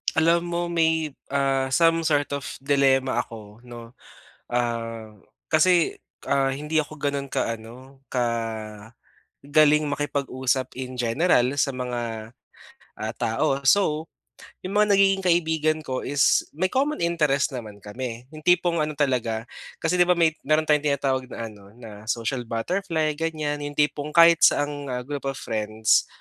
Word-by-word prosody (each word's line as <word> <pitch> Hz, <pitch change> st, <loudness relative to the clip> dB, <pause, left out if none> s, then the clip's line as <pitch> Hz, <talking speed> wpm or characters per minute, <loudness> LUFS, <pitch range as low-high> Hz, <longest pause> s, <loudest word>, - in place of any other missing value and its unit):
Alam 165 Hz, +2 st, +4 dB
mo 170 Hz, 0 st, -2 dB
may, 160 Hz, -2 st, +1 dB, 0.2 s
ah, 135 Hz, -1 st, 0 dB
some 165 Hz, +5 st, +3 dB
sort 145 Hz, -2 st, +1 dB
of 140 Hz, -1 st, -3 dB, 0.2 s
dilemma 135 Hz, -2 st, +2 dB
ako 105 Hz, -1 st, -8 dB
‘no, 120 Hz, -1 st, -10 dB, 0.6 s
ah, 115 Hz, -2 st, -2 dB, 0.4 s
kasi, 175 Hz, +1 st, +3 dB, 0.3 s
ah, 135 Hz, -1 st, +2 dB
hindi 150 Hz, +3 st, -1 dB
ako 155 Hz, 0 st, -4 dB
ganon 140 Hz, -1 st, -2 dB
ka 115 Hz, -, -1 dB
ano, 130 Hz, +5 st, -14 dB
ka 125 Hz, -2 st, +1 dB, 1.2 s
galing 150 Hz, +1 st, +4 dB
makipag-usap 135 Hz, -3 st, -2 dB
in 130 Hz, -1 st, -6 dB
general 125 Hz, +1 st, +2 dB
sa 140 Hz, -, +2 dB
mga, 120 Hz, -3 st, -5 dB, 0.7 s
ah, 110 Hz, +1 st, -3 dB
tao. 115 Hz, +4 st, 0 dB
So, 160 Hz, -4 st, +3 dB, 0.6 s
'yung 190 Hz, +2 st, -5 dB
mga 210 Hz, -1 st, +4 dB
nagiging 195 Hz, 0 st, +3 dB
kaibigan 160 Hz, -2 st, +2 dB
ko 130 Hz, -2 st, -3 dB
is 145 Hz, -1 st, +3 dB
may 185 Hz, +4 st, +1 dB
common 285 Hz, +3 st, 0 dB
interest 150 Hz, -5 st, +1 dB
naman 105 Hz, -4 st, -8 dB
kami. 120 Hz, +2 st, -6 dB
'Yung 155 Hz, -1 st, -11 dB
tipong 175 Hz, -1 st, +3 dB
ano 155 Hz, 0 st, -1 dB
talaga, 125 Hz, -6 st, 0 dB, 0.4 s
kasi 165 Hz, +2 st, +1 dB
'di 175 Hz, -, +6 dB
ba 180 Hz, -, +4 dB
may 165 Hz, -2 st, +4 dB, 0.2 s
meron 155 Hz, +1 st, +3 dB
tayong 150 Hz, -1 st, +2 dB
tinatawag 135 Hz, -2 st, 0 dB
na 115 Hz, -, -5 dB
ano 100 Hz, -1 st, -16 dB
na 110 Hz, -3 st, -12 dB
social 115 Hz, +2 st, -2 dB
butterfly 160 Hz, +7 st, -1 dB
ganyan, 155 Hz, -2 st, -2 dB
'yung 145 Hz, 0 st, -6 dB
tipong 150 Hz, 0 st, 0 dB
kahit 170 Hz, -1 st, +7 dB
saang 145 Hz, -1 st, +1 dB, 0.2 s
group 145 Hz, -1 st, -5 dB
of 135 Hz, -, -2 dB
friends, 110 Hz, 0 st, +1 dB
140 Hz, 145 wpm, -24 LUFS, 125-160 Hz, 1.2 s, kahit